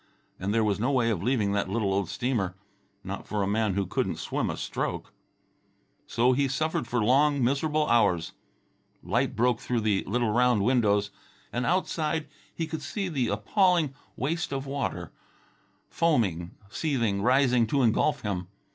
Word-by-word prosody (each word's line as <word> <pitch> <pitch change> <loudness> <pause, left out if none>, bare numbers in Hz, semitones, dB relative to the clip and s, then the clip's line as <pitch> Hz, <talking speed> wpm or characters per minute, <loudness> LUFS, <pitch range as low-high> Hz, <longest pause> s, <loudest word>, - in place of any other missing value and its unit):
And 95 +2 -2
there 110 +1 +2
was 105 -2 0
no 125 +6 +1
way 120 -4 +2
of 95 -6 -2
leaving 110 -3 +1
that 100 -2 0
little 100 -1 0
old 100 -2 -1
steamer... 110 -8 -1 0.5
not - - -6
for 105 -2 -1
a - - -1
man 105 -1 +1
who 100 -1 0
couldn't - - -1
swim - - -2
a - - -3
stroke. - - -4 0.9
So 125 +2 +3
he 140 +2 +2
suffered 140 -1 -1
for 120 -2 0
long 140 +3 +3
miserable 150 +4 +1
hours. 90 -8 +2 0.7
Light - - 0
broke 120 +1 +2
through 120 -2 -1
the 105 -2 +1
little 115 +2 0
round 120 -2 +3
windows, 105 -4 +2 0.4
and 125 +1 -1
outside 160 -4 0 0.2
he 165 - -3
could 160 0 -5
see 190 +6 -3
the 135 -7 0
appalling 160 - +2 0.2
waste 160 +6 -2
of 135 0 -3
water, 140 0 -3 0.8
foaming, 100 - 0 0.2
seething, 115 -11 0
rising 125 -1 +3
to 135 +3 +1
engulf 125 +4 +2
him. 95 -4 -3
120 Hz, 160 wpm, -27 LUFS, 105-140 Hz, 0.9 s, So